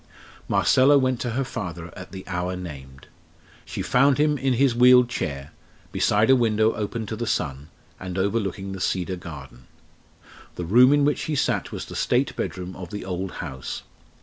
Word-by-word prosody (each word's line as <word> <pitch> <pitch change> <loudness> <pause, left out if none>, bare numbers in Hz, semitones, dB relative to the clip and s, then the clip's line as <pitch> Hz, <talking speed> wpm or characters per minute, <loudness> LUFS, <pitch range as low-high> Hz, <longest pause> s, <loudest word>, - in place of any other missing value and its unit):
Marcella 140 +3 +4
went 130 -2 +1
to 120 - -2
her 135 - +1
father 85 -8 -6
at 90 - -10
the 95 -1 -9
hour 90 0 -2
named. 70 -7 -9 0.6
She - - -5
found 135 +1 +3
him 150 0 +3
in 135 -2 0
his 130 +1 +3
wheeled 125 0 +6
chair, 70 - -4 0.4
beside 110 +5 +3
a - - +7
window 110 -2 +2
opened 110 +1 -4
to 110 - -3
the 120 +1 -4
sun, 70 -4 -2 0.3
and 90 0 -6
overlooking 100 -1 -1
the 95 -1 -6
Cedar 95 0 -1
Garden. 70 -8 -11 0.9
The 90 - -4
room 125 +9 +6
in 145 -1 +4
which 150 - 0
he 155 - -2
sat - - 0
was - - -5
the - - -9
state - - +1
bedroom 90 0 -4
of 90 -2 -8
the 105 - -6
old 95 0 -4
house. 65 -4 -6
100 Hz, 175 wpm, -24 LUFS, 90-125 Hz, 0.9 s, a